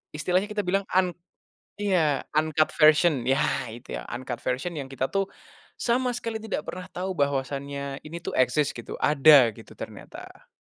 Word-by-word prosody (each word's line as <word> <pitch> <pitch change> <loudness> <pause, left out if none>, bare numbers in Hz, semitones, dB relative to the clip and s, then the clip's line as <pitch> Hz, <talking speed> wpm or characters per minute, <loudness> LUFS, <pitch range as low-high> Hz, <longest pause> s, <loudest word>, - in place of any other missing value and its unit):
istilahnya 180 +6 +1
kita 210 -1 -2
bilang 195 +2 0
an 185 -1 +2 0.7
iya 165 -8 +2 0.2
uncut 155 0 +2
version, 155 -4 +5
ya, 135 +2 +3 0.3
gitu 120 +2 -7
ya, - - -9
uncut 125 -1 -5
version 130 +8 -2
yang 135 - -4
kita 135 0 -3
tuh 195 -1 0 0.5
sama 250 +1 0
sekali 230 -2 -3
tidak 215 -8 -4
pernah 180 0 -8
tahu 185 +2 -3
bahwasannya 140 0 -2
ini 170 +2 -7
tuh - - -5
eksis, 130 +3 +3
gitu, 120 - -7
ada 145 -4 +7
gitu - - -13
ternyata. - - -10
155 Hz, 160 wpm, -26 LUFS, 135-185 Hz, 0.7 s, ada